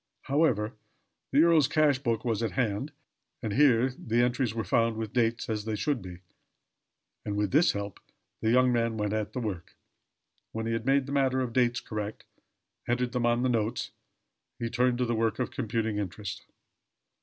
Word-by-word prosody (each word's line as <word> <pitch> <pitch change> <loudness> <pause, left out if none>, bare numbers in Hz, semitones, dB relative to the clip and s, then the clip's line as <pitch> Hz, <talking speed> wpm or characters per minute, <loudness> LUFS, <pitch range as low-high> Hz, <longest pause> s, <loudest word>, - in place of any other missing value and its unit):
However, 130 -7 +1 0.6
the 145 +3 +5
earl's 165 -5 +5
cash 150 -4 +3
book 115 -4 -1
was 115 -2 0
at 115 - -1
hand, 125 +3 -1 0.5
and 110 -2 -2
here 130 -2 +4
the 120 0 +1
entries 120 -2 0
were 115 - -1
found 115 0 +1
with 110 -2 -4
dates, 115 -2 +1
as 110 -2 -2
they 110 -1 -2
should 135 +3 -1
be; 90 -2 -9 1.0
and 105 -1 -3
with 105 -2 0
this 155 +5 +4
help 100 -1 -5 0.4
the 110 - +1
young 125 +1 +4
man 115 -1 0
went 105 -1 -1
at 110 -1 -2
the 130 - -2
work. 100 -7 -5 0.8
When 110 0 -3
he 115 - -1
had 115 +1 -3
made 135 0 +3
the 140 - -7
matter 135 -2 +2
of 125 -3 -3
dates 120 -1 +2
correct 105 -1 -5 0.6
entered 120 +1 0
them 125 -2 0
on 120 +1 +2
the - - +3
note 115 -2 -1 0.7
he 115 -1 -3
turned 125 0 +2
to 125 - +1
the 120 - -1
work 115 -1 0
of 125 - -2
computing 110 -3 -2
interest. 100 0 -5
115 Hz, 185 wpm, -28 LUFS, 110-125 Hz, 1.0 s, the